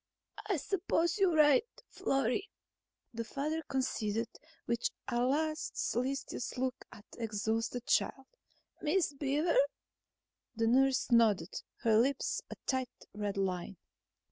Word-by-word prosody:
"I 395 -4 +1
suppose 345 +2 0
you're 375 -4 +4
right, 295 +2 +6 0.2
Florry," 275 - 0 0.6
the 230 0 -3
father 300 +7 -2
conceded, 230 -4 -1 0.4
with 235 0 0 0.2
a 240 - 0
last 310 +4 0
solicitous 260 +1 -2
look 255 0 -2
at 210 - -13
the - - -10
exhausted 225 +2 -1
child. 270 - +1 0.6
"Miss 320 0 +1
Beaver...?" 290 - +1 1.0
The 225 0 +1
nurse 260 +2 +3
nodded, 215 -7 +4 0.3
her 220 -1 +5
lips 265 +3 +1
a - - -6
tight 260 -2 -2
red 205 0 -3
line. 185 -1 -2
255 Hz, 115 wpm, -33 LUFS, 225-295 Hz, 1.0 s, right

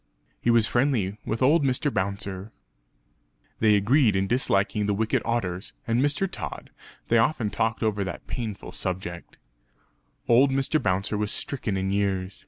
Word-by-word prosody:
He - - 0
was 115 -2 +5
friendly 115 -6 0
with 115 +4 -1
old 150 +4 +4
Mr. 135 +2 +1
Bouncer; 100 +1 -3 1.1
they 110 -2 +5
agreed 110 +2 +3
in 95 0 +1
disliking 105 -2 +1
the 105 - +1
wicked 110 +2 0
otters 100 -5 -2
and 115 +2 +1
Mr. 145 +7 +1
Tod; 80 - -7 0.4
they 115 - +5
often 115 -3 +1
talked 115 +2 -1
over 105 -2 0
that 95 - -6
painful 110 -5 -5
subject. 90 -2 -5 0.9
Old 125 +4 +5
Mr. 135 +3 +1
Bouncer 100 +3 0
was 105 -1 -1
stricken 115 -8 -2
in 95 0 -1
years. 100 -1 -1
110 Hz, 150 wpm, -26 LUFS, 100-125 Hz, 1.1 s, was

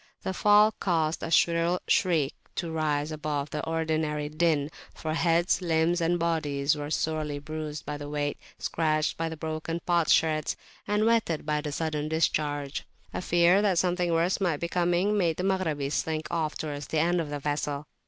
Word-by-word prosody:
The 190 - -2
fall 210 +2 +5
caused 165 -3 0
a - - -3
shriller 170 +1 +3
shriek 160 -6 +2 0.2
to 170 -2 -3
rise 155 -1 0
above 150 -2 -3
the 150 - -3
ordinary 155 -2 -1
din, 155 -2 +1 0.2
for 155 -1 -3
heads, 170 +2 +2
limbs, 170 0 +1
and 170 +1 +2
bodies 155 -4 0
were 145 0 -5
sorely 155 -1 -1
bruised 150 +1 -6
by 150 0 -4
the 145 0 -7
weight, 145 -1 -2 0.2
scratched 155 -1 0
by 165 0 -2
the 160 - -7
broken 160 +1 -3
potsherds, 160 -2 +2 0.3
and 210 +1 +2
wetted 225 -10 +1
by 150 0 0
the 150 -1 -4
sudden 155 0 -2
discharge. 145 -3 0 0.3
A - - -3
fear 175 +2 +4
that 195 -4 +2
something 180 0 +1
worse 170 +4 +1
might 175 -6 +1
be 170 - -2
coming 180 +4 +1
made 165 -4 +1
the 180 - -2
Maghrabis 160 -7 0
slink 155 -1 -1
off 160 -2 -1
towards 145 -3 -5
the 160 - -2
end 170 +2 +2
of 155 - -5
the 145 - -3
vessel. 145 0 -2
160 Hz, 175 wpm, -28 LUFS, 150-170 Hz, 0.3 s, fall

